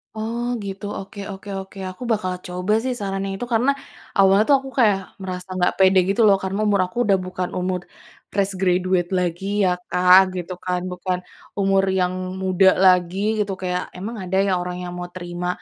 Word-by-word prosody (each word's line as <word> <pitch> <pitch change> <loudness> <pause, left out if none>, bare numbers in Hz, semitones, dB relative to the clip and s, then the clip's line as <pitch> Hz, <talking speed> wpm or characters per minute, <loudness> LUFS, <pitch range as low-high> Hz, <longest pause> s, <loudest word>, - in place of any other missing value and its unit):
Oh, 230 +2 -3 0.2
gitu, 195 +1 -6
oke 195 +1 -10
oke 195 +1 -9
oke, 190 +1 -10
aku 185 +6 -9
bakal 205 -4 0 0.2
coba 180 +4 -1
sih 260 - -1
sarannya 195 -1 -3
itu 245 - -3
karena 245 +5 +3 0.5
awalnya 195 +2 +6
tuh 280 - +7
aku 270 0 -9
kayak 210 -5 +5 0.3
merasa 185 0 -6
nggak 180 -1 +2
pede 190 0 +5
gitu 200 +4 +2
loh 200 - +6
karena 190 +2 -2
umur 200 -2 +3
aku 210 +7 -12
udah 200 - +5
bukan 185 0 -3
umur 180 0 -1 0.5
fresh 195 -1 0
graduate 180 -1 +2
lagi 175 +1 -2 0.2
ya 185 - +3 0.2
Kak 185 +1 +5
gitu 180 0 -4
kan, 180 -1 0
bukan 180 0 -2 0.4
umur 195 0 +3 0.2
yang 180 0 +1 0.3
muda 190 0 +4 0.2
lagi 185 +4 +3
gitu 200 -2 0
kayak 180 0 -1
emang 205 +6 -5
ada 185 +1 -3
ya - - +1
orang 180 0 -4
yang 175 - -5
mau 175 - -5
terima 175 0 -5
190 Hz, 185 wpm, -22 LUFS, 180-200 Hz, 0.5 s, tuh